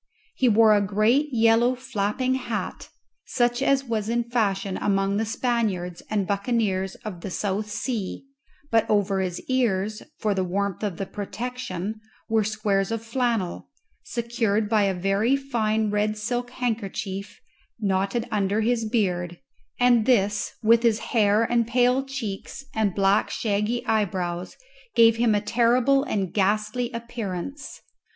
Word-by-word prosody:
He 255 Hz, -, +2 dB
wore 220 Hz, 0 st, +6 dB
a 205 Hz, -, +3 dB
great 215 Hz, +9 st, +2 dB
yellow 230 Hz, +1 st, +4 dB
flapping 255 Hz, 0 st, -1 dB
hat, 240 Hz, -4 st, -4 dB, 0.4 s
such 240 Hz, 0 st, +1 dB
as 275 Hz, 0 st, +3 dB
was 225 Hz, -4 st, -2 dB
in 235 Hz, +1 st, +1 dB
fashion 205 Hz, -5 st, -1 dB
among 195 Hz, 0 st, +1 dB
the 220 Hz, -, 0 dB
Spaniards 215 Hz, -7 st, -1 dB
and 205 Hz, -2 st, 0 dB
buccaneers 200 Hz, -2 st, 0 dB
of 185 Hz, -5 st, -6 dB
the 195 Hz, -, -5 dB
South 205 Hz, +3 st, -2 dB
Sea; 215 Hz, +1 st, -3 dB, 0.5 s
but 225 Hz, -1 st, +3 dB
over 200 Hz, -2 st, +2 dB
his 180 Hz, -2 st, -2 dB
ears, 215 Hz, -5 st, 0 dB, 0.2 s
for 215 Hz, -2 st, 0 dB
the 190 Hz, -1 st, 0 dB
warmth 195 Hz, +1 st, -2 dB
of 200 Hz, -6 st, -2 dB
the 195 Hz, -, -3 dB
protection, 215 Hz, -1 st, -5 dB, 0.3 s
were 220 Hz, -1 st, +2 dB
squares 205 Hz, -2 st, 0 dB
of 225 Hz, 0 st, -3 dB
flannel, 230 Hz, -6 st, -1 dB, 0.3 s
secured 230 Hz, -3 st, -1 dB
by 215 Hz, -1 st, +3 dB
a 195 Hz, -1 st, 0 dB
very 195 Hz, +7 st, +2 dB
fine 220 Hz, -6 st, 0 dB
red 210 Hz, +1 st, 0 dB
silk 245 Hz, +3 st, -2 dB
handkerchief 215 Hz, -5 st, -4 dB, 0.4 s
knotted 200 Hz, +3 st, 0 dB
under 205 Hz, 0 st, +1 dB
his 230 Hz, 0 st, +1 dB
beard, 175 Hz, -6 st, 0 dB, 0.4 s
and 245 Hz, -3 st, +4 dB
this, 210 Hz, -4 st, +2 dB
with 230 Hz, +1 st, +5 dB
his 230 Hz, -2 st, +3 dB, 0.2 s
hair 210 Hz, -1 st, +4 dB
and 235 Hz, -1 st, +1 dB
pale 250 Hz, +2 st, +3 dB
cheeks 270 Hz, -2 st, -6 dB
and 215 Hz, -4 st, 0 dB
black 195 Hz, +1 st, +3 dB
shaggy 215 Hz, +2 st, -1 dB
eyebrows, 185 Hz, -5 st, -1 dB, 0.4 s
gave 230 Hz, -1 st, +6 dB
him 230 Hz, -2 st, +3 dB
a 205 Hz, -, +1 dB
terrible 245 Hz, +5 st, +3 dB
and 195 Hz, -, -2 dB
ghastly 215 Hz, +4 st, 0 dB
appearance. 235 Hz, +2 st, -6 dB
215 Hz, 140 wpm, -25 LUFS, 200-240 Hz, 0.5 s, wore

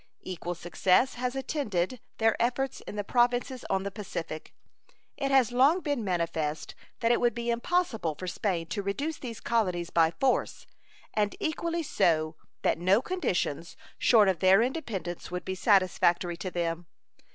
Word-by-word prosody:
Equal 175 Hz, -1 st, -5 dB
success 180 Hz, +8 st, +2 dB
has 250 Hz, +1 st, -3 dB
attended 255 Hz, -, -2 dB, 0.2 s
their 225 Hz, 0 st, +3 dB
efforts 255 Hz, +2 st, 0 dB
in -, -, -6 dB
the 205 Hz, -, -2 dB
Provinces 245 Hz, +3 st, +1 dB
on 190 Hz, -, +1 dB
the 200 Hz, -, -4 dB
Pacific. 175 Hz, -6 st, -6 dB, 0.6 s
It 275 Hz, -, -2 dB
has 265 Hz, -4 st, +4 dB
long 275 Hz, +9 st, +4 dB
been 285 Hz, -8 st, -1 dB
manifest 165 Hz, -5 st, -2 dB, 0.3 s
that 230 Hz, -, +3 dB
it 240 Hz, -, +2 dB
would 240 Hz, -2 st, +2 dB
be 235 Hz, 0 st, -1 dB
impossible 235 Hz, -, 0 dB
for 185 Hz, -, -7 dB
Spain 180 Hz, -2 st, -1 dB
to 205 Hz, -, -2 dB
reduce 280 Hz, +11 st, -3 dB
these 230 Hz, -5 st, -6 dB
colonies 180 Hz, -7 st, 0 dB
by 165 Hz, -1 st, +4 dB
force, 255 Hz, +10 st, 0 dB, 0.5 s
and 210 Hz, -1 st, 0 dB
equally 335 Hz, +2 st, -1 dB
so 155 Hz, -, +1 dB, 0.3 s
that -, -, +2 dB
no 185 Hz, +4 st, +4 dB
conditions 180 Hz, -, -2 dB, 0.2 s
short 220 Hz, -4 st, +5 dB
of 185 Hz, -4 st, +1 dB
their 190 Hz, +5 st, +6 dB
independence 225 Hz, -, -4 dB
would 180 Hz, 0 st, -5 dB
be 190 Hz, -, -2 dB
satisfactory 185 Hz, -3 st, +2 dB
to 185 Hz, -, -5 dB
them. 170 Hz, -1 st, -3 dB
205 Hz, 155 wpm, -28 LUFS, 175-250 Hz, 0.6 s, their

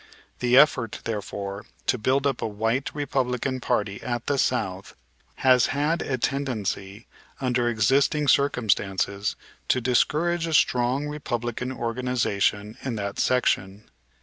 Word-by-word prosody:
The 125 Hz, 0 st, +3 dB
effort, 125 Hz, -6 st, +4 dB
therefore, 100 Hz, -2 st, -4 dB, 0.2 s
to 125 Hz, -, +1 dB
build 130 Hz, +5 st, +1 dB
up 140 Hz, -, 0 dB
a -, -, -1 dB
"white" 115 Hz, +5 st, -1 dB
Republican 130 Hz, -2 st, -1 dB
party 100 Hz, -4 st, -1 dB
at 120 Hz, -1 st, -3 dB
the 140 Hz, -1 st, 0 dB
South 100 Hz, -8 st, -1 dB, 0.4 s
has 130 Hz, -2 st, +4 dB
had 150 Hz, +4 st, 0 dB
a 130 Hz, -, -2 dB
tendency, 115 Hz, -6 st, -3 dB, 0.3 s
under 125 Hz, -2 st, +1 dB
existing 135 Hz, +7 st, +2 dB
circumstances, 105 Hz, -7 st, +1 dB, 0.3 s
to 130 Hz, -, +2 dB
discourage 165 Hz, +8 st, +1 dB
a 160 Hz, -, 0 dB
strong 125 Hz, +1 st, +2 dB
Republican 125 Hz, -4 st, -3 dB
organization 115 Hz, -4 st, -1 dB
in 130 Hz, -4 st, -3 dB
that 100 Hz, -1 st, -4 dB
section. 105 Hz, -5 st, 0 dB
125 Hz, 120 wpm, -25 LUFS, 105-135 Hz, 0.4 s, effort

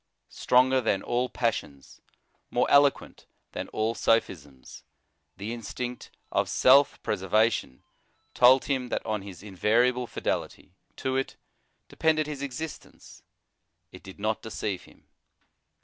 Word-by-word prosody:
Stronger 130 Hz, +1 st, +3 dB
than 105 Hz, -5 st, 0 dB
all 125 Hz, +1 st, -1 dB
passions, 90 Hz, -, -4 dB, 0.5 s
more -, -, +1 dB
eloquent 140 Hz, -1 st, +3 dB, 0.2 s
than -, -, -5 dB
all 110 Hz, +1 st, -1 dB
sophisms, 75 Hz, -, -2 dB, 0.6 s
the 105 Hz, +4 st, -5 dB
instinct 120 Hz, +2 st, -6 dB, 0.2 s
of -, -, 0 dB
self 135 Hz, +2 st, +5 dB
pre -, -, 0 dB
servation 105 Hz, -, 0 dB, 0.5 s
told 130 Hz, +2 st, +6 dB
him 130 Hz, -3 st, -2 dB
that -, -, -3 dB
on 110 Hz, -2 st, -2 dB
his 95 Hz, -2 st, -11 dB
invariable 115 Hz, +6 st, +1 dB
fidelity -, -, -4 dB, 0.2 s
to 130 Hz, 0 st, -2 dB
it 135 Hz, 0 st, -2 dB, 0.5 s
depended 155 Hz, -1 st, +1 dB
his 145 Hz, -2 st, -6 dB
existence: 140 Hz, +3 st, -8 dB, 0.7 s
it -, -, -12 dB
did 95 Hz, +1 st, -13 dB
not 110 Hz, +1 st, -1 dB
deceive 105 Hz, -4 st, -4 dB
him. -, -, -21 dB
120 Hz, 120 wpm, -27 LUFS, 105-130 Hz, 0.7 s, told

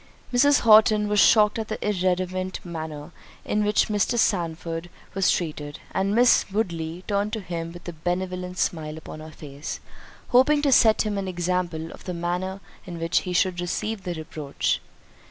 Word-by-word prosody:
Mrs. 285 Hz, +4 st, +5 dB
Horton 215 Hz, -1 st, +6 dB
was 205 Hz, 0 st, +2 dB
shocked 210 Hz, +2 st, +5 dB
at 220 Hz, -, -3 dB
the 215 Hz, -, -4 dB
irreverent 185 Hz, -1 st, -1 dB
manner 160 Hz, -2 st, -6 dB, 0.3 s
in 210 Hz, 0 st, 0 dB
which 210 Hz, 0 st, +2 dB
Mr. 215 Hz, +3 st, 0 dB
Sandford 170 Hz, -4 st, -1 dB, 0.2 s
was 195 Hz, -2 st, +2 dB
treated—and 165 Hz, +5 st, -2 dB
Miss 245 Hz, +1 st, +5 dB
Woodley 170 Hz, -4 st, -2 dB
turned 205 Hz, 0 st, 0 dB
to 220 Hz, -, -1 dB
him 170 Hz, -4 st, -5 dB
with 175 Hz, +1 st, -12 dB
a 175 Hz, -, -5 dB
benevolent 180 Hz, +2 st, -3 dB
smile 155 Hz, -3 st, -2 dB
upon 155 Hz, -1 st, -9 dB
her 155 Hz, 0 st, -9 dB
face, 145 Hz, -2 st, -7 dB, 0.5 s
hoping 290 Hz, +4 st, +4 dB
to 280 Hz, -, +3 dB
set 225 Hz, -3 st, +5 dB
him 210 Hz, -2 st, -2 dB
an 195 Hz, -, -4 dB
example 175 Hz, -2 st, -2 dB
of -, -, -13 dB
the 180 Hz, -, -4 dB
manner 180 Hz, +3 st, -3 dB, 0.3 s
in 175 Hz, -1 st, -6 dB
which 165 Hz, +1 st, +2 dB
he -, -, -2 dB
should 180 Hz, 0 st, +1 dB
receive 215 Hz, +4 st, -3 dB
the 180 Hz, -2 st, -4 dB
reproach. 155 Hz, -3 st, -2 dB
180 Hz, 165 wpm, -25 LUFS, 165-210 Hz, 0.5 s, Horton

